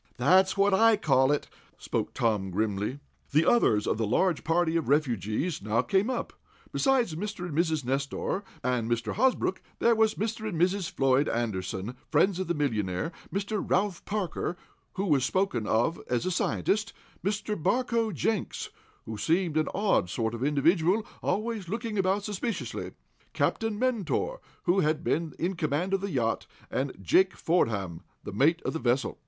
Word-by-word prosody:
"That's 185 +10 +4
what 200 0 +4
I 225 +2 +5
call 135 -8 +3
it," 145 - 0 0.3
spoke - - -3
Tom, 105 -5 +1
grimly. 105 +7 -2 0.3
The 155 +3 +4
others 135 - +4
of 110 - 0
the 110 - 0
larger 170 - +2
party 165 0 +1
of 165 - 0
refugees 130 - 0
now 110 +3 +1
came 200 +3 +1
up. 260 - -3 0.4
Besides 260 - +2
Mr. 200 +2 -4
and 165 -5 -5
Mrs. 160 -4 +1
Nestor, 140 +9 -2 0.2
and 125 -2 0
Mr. 115 -2 -1
Hosbrook, 265 - +1 0.2
there 235 - +4
was 220 -1 +3
Mr. 220 +1 -2
and 170 -6 -4
Mrs. 185 +1 +1
Floyd 135 +1 +2
Anderson, 105 -1 -2
friends 180 +4 +3
of 190 - -2
the 170 - 0
millionaire; 110 - -1 0.2
Mr. 200 +1 -2
Ralph 190 -1 0
Parker, 185 -4 -2 0.4
who 195 - -2
was 145 -8 +3
spoken 130 - 0
of 120 +10 +1
as 120 -1 0
a 185 - 0
scientist, 210 +4 0 0.3
Mr. 210 +1 -1
Barcoe 230 +5 +1
Jenks, 205 +5 -2 0.3
who 110 -1 -6
seemed 165 - +1
an 155 0 +2
odd 195 - +1
sort 110 +4 -1
of 115 +2 -4
individual, 165 +8 +2 0.2
always 215 -3 -2
looking 225 0 -2
about 190 +2 +1
suspiciously, 210 +2 -4 0.4
Captain 225 -2 0
Mentor, 255 - -1 0.2
who 180 +2 +3
had 155 -1 +1
been 165 -2 -1
in 180 +3 -1
command 165 +4 -1
of 195 - +1
the 200 - -3
yacht, 120 -8 -1 0.2
and 135 +1 -1
Jake 190 - +4
Fordam, 100 - 0 0.2
the - - -7
mate 155 +10 +3
of - - -2
the 160 - -2
vessel. 130 +2 0
170 Hz, 165 wpm, -28 LUFS, 125-200 Hz, 0.4 s, I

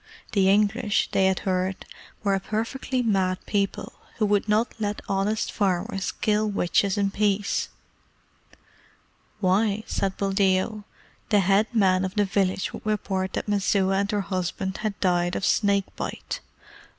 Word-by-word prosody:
The 195 -2 +3
English, 210 +1 +2
they 190 -1 +3
had 190 -1 0
heard, 185 0 -1 0.4
were 200 -2 +2
a 195 - +1
perfectly 230 +5 -2
mad 190 -4 +1
people, 200 -2 -1 0.2
who 215 - +2
would 205 0 +1
not 215 +3 +2
let 210 -1 -2
honest 200 +2 0
farmers 195 +1 -1
kill 215 0 0
witches 200 +1 +1
in 200 -1 +1
peace. 205 0 0 1.7
Why, 200 +3 +2
said 195 -1 -2
Buldeo, 195 +1 +1 0.4
the 205 -2 +4
head 195 +4 +3
man 190 -5 +3
of 190 +2 -3
the 205 -1 +3
village 190 0 0
would - - -8
report 195 -3 -1
that - - -3
Messua 195 -1 +2
and 200 0 0
her 210 -2 0
husband 190 0 -3
had 215 -2 -3
died 175 -1 +1
of - - -1
snake 200 -2 +1
bite. - - -5
200 Hz, 145 wpm, -25 LUFS, 190-210 Hz, 1.7 s, the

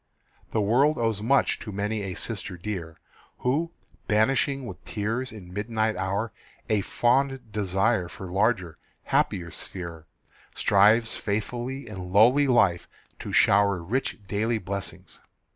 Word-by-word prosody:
The 110 - 0
world 130 +9 +3
owes 115 -3 0
much 135 +5 +2
to 115 -3 -7
many 105 +2 -2
a 95 -2 -4
sister 100 -4 -5
dear, 85 -3 -5 0.4
Who, 155 +7 0 0.4
banishing 130 +5 +2
with 95 -4 -9
tears 115 +5 -2
in 90 -5 -11
midnight 110 +2 -1
hour 100 +3 -2 0.4
A 105 -2 +3
fond 130 +2 +1
desire 100 0 +1
for 95 - -8
larger, 95 -4 0 0.2
happier 85 -2 0
sphere, 85 -3 -7 0.5
Strives 105 +3 +4
faithfully 120 +6 -3
in 95 -4 -7
lowly 125 +9 +5
life 100 -9 +3 0.3
to - - -6
shower 100 -1 +4
Rich 110 +1 -2
daily 110 +4 0
blessings. 100 -1 -6
105 Hz, 125 wpm, -26 LUFS, 95-120 Hz, 0.5 s, lowly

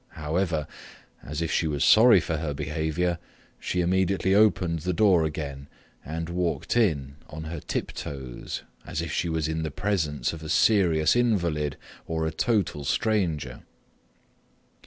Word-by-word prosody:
However, 80 0 -1 0.6
as 75 +4 -4
if 80 - -2
she 80 - +1
was 75 -2 0
sorry 110 -2 +7
for 80 -1 -2
her 75 -2 -3
behaviour, 80 +3 -1 0.4
she 90 - -1
immediately 95 +2 +1
opened 95 -5 +3
the 90 +4 -2
door 95 -6 +4
again 70 -3 -5 0.4
and 80 +2 -4
walked 85 - -2
in 75 - +1
on 80 +1 -7
her 80 +1 -5
tiptoes, 65 -4 -5 0.2
as 80 0 -4
if 85 - -5
she 85 - -1
was 80 -1 -1
in 80 0 -2
the 80 - -2
presence 75 -7 -1
of 80 - -8
a 80 - -7
serious 85 -7 +4
invalid 85 - +1 0.3
or 80 -1 -1
a 80 - -1
total 95 -4 0
stranger. 90 - -1
80 Hz, 145 wpm, -26 LUFS, 75-90 Hz, 0.6 s, sorry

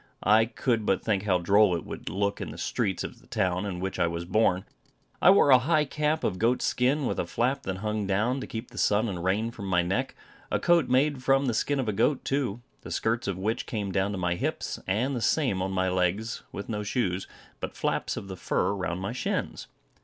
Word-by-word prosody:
I 110 +2 +5
could 115 0 -1
but 95 - +1
think 105 -2 0
how 95 -3 +3
droll 100 +1 +4
it 85 - -5
would - - -6
look 100 +1 -1
in - - -4
the - - -9
streets 95 -3 -1
of - - -8
the - - -22
town 95 +2 0
in 90 -3 -4
which 95 +1 -4
I - - +3
was 85 +1 -4
born. 95 -1 +2 0.6
I - - +7
wore 190 -7 +6
a 130 - +8
high 150 +3 +2
cap 150 +2 -1
of 90 - -1
goat's 120 +3 +2
skin, 135 +4 +1
with - - -1
a - - -1
flap 130 +4 0
that 95 -1 -2
hung, 105 0 -2
down, 110 +7 +1
to - - -6
keep 115 +2 -6
the - - -7
sun 105 +3 +2
and 90 -5 -4
rain 105 +5 0
from 100 -4 -7
my 90 -2 +2
neck, 95 +3 -1 0.3
a - - 0
coat 170 -6 +3
made 135 +1 +2
from 135 +1 +3
the 125 - +1
skin 140 +5 0
of 130 - -1
a 105 - 0
goat 135 +7 +1
too, 125 -5 -1 0.2
the - - -9
skirts 115 0 -1
of 100 -3 -2
which 110 +5 -2
came 105 -4 -3
down 100 +1 0
to 100 - -3
my 90 -1 0
hips, 85 - -3
and 120 +8 0
the 120 - -2
same 120 -9 +1
on 95 +1 -1
my 95 -1 +1
legs, 95 +5 0
with 100 - -6
no 105 -2 -3
shoes, 100 -4 -1 0.3
but - - -6
flaps - - -1
of 100 - -6
the 95 - -6
fur 100 - 0
round 90 -2 -3
my 100 +4 -3
shins. 130 - -3
105 Hz, 235 wpm, -27 LUFS, 95-125 Hz, 0.6 s, a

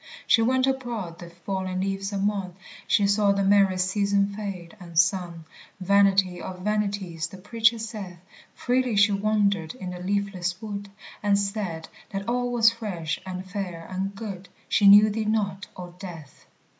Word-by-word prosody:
She 225 - +5
went 255 +3 +3
abroad 240 -10 -3
the 175 - -9
falling 185 +2 -4
leaves 195 +1 -2
among, 195 -2 -1 0.3
She 205 - +3
saw 200 0 +3
the 200 0 0
merry 195 -1 +4
season 200 +2 +1
fade, 195 -4 -6
and 170 -3 -10
sung 170 -1 +1 0.3
Vanity 195 -1 +3
of 185 -1 -7
vanities 200 -5 -2
the 190 - -11
Preacher 225 +4 +2
saith 215 -5 -6 0.4
Freely 250 -2 0
she 205 +1 +5
wandered 200 -4 +1
in 185 -7 -6
the 180 - -7
leafless 185 -1 -2
wood, 205 -2 -6 0.3
And 205 -1 +3
said 200 -5 -3 0.2
that 195 -1 -5
all 245 +1 0
was 230 -2 +5
fresh, 190 -9 -4
and 185 0 -6
fair, 180 -4 -5
and 195 +2 -3
good 195 -3 -7 0.2
She 205 - +4
knew 205 +2 +8
thee 215 +1 -2
not, 205 -3 -1
O 180 -1 -8
Death. 165 -7 -10
200 Hz, 155 wpm, -25 LUFS, 185-210 Hz, 0.4 s, knew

